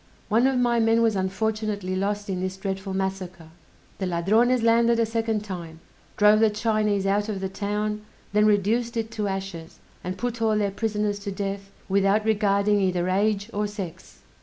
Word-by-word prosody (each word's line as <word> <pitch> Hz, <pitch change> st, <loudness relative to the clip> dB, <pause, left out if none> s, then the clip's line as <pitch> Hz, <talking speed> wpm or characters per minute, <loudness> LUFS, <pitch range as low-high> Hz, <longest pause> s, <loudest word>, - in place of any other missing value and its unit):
One 230 Hz, +4 st, +4 dB
of 265 Hz, -1 st, +1 dB
my 240 Hz, -1 st, +2 dB
men 225 Hz, 0 st, +3 dB
was 225 Hz, -2 st, +2 dB
unfortunately 205 Hz, 0 st, -2 dB
lost 205 Hz, +2 st, -2 dB
in 190 Hz, -2 st, -2 dB
this 185 Hz, 0 st, -3 dB
dreadful 195 Hz, 0 st, -4 dB
massacre! 190 Hz, -3 st, -4 dB, 0.5 s
The 190 Hz, -, -1 dB
Ladrones 220 Hz, +8 st, +2 dB
landed 230 Hz, 0 st, +4 dB
a 230 Hz, -, +3 dB
second 225 Hz, -1 st, -1 dB
time, 170 Hz, -5 st, -7 dB, 0.4 s
drove 210 Hz, +1 st, +6 dB
the 220 Hz, 0 st, +5 dB
Chinese 210 Hz, -2 st, 0 dB
out 205 Hz, +2 st, +1 dB
of 200 Hz, -3 st, -3 dB
the 190 Hz, -, -2 dB
town, 210 Hz, +2 st, -2 dB, 0.3 s
then 210 Hz, +1 st, +4 dB
reduced 225 Hz, +4 st, +1 dB
it 225 Hz, 0 st, -2 dB
to 210 Hz, -2 st, -2 dB
ashes, 190 Hz, -4 st, -5 dB, 0.3 s
and 185 Hz, +2 st, -4 dB
put 240 Hz, +1 st, -3 dB
all 220 Hz, -1 st, +2 dB
their 205 Hz, -2 st, 0 dB
prisoners 210 Hz, 0 st, -1 dB
to 200 Hz, 0 st, -5 dB
death, 195 Hz, 0 st, -4 dB, 0.2 s
without 200 Hz, +2 st, +2 dB
regarding 205 Hz, -1 st, +2 dB
either 180 Hz, -1 st, 0 dB
age 205 Hz, +2 st, 0 dB
or 210 Hz, +1 st, -1 dB
sex! 185 Hz, -4 st, -8 dB
205 Hz, 175 wpm, -25 LUFS, 195-220 Hz, 0.5 s, drove